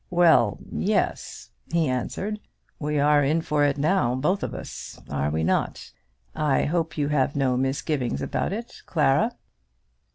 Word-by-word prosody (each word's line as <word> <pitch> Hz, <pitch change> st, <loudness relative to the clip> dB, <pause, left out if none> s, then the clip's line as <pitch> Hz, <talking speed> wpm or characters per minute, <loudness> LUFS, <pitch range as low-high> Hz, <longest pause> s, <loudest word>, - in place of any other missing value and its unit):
"Well, 165 Hz, -, +4 dB
yes," -, -, -1 dB, 0.2 s
he 165 Hz, -2 st, +2 dB
answered. 190 Hz, -, -2 dB, 0.4 s
"We 150 Hz, 0 st, -1 dB
are 145 Hz, 0 st, +4 dB
in 155 Hz, +4 st, +1 dB
for 150 Hz, -2 st, +1 dB
it 145 Hz, -1 st, +2 dB
now, 140 Hz, -5 st, +2 dB
both 180 Hz, +10 st, 0 dB
of -, -, -4 dB
us; -, -, -8 dB
are 70 Hz, 0 st, 0 dB
we 80 Hz, +2 st, -1 dB
not? -, -, -1 dB, 0.4 s
I 150 Hz, -3 st, +1 dB
hope 160 Hz, 0 st, -1 dB
you 145 Hz, -1 st, 0 dB
have 145 Hz, -1 st, +1 dB
no 135 Hz, -3 st, +2 dB
misgivings 135 Hz, 0 st, -1 dB
about -, -, -2 dB
it, 230 Hz, +4 st, -6 dB
Clara." 155 Hz, -, +2 dB
145 Hz, 150 wpm, -25 LUFS, 130-165 Hz, 0.4 s, Well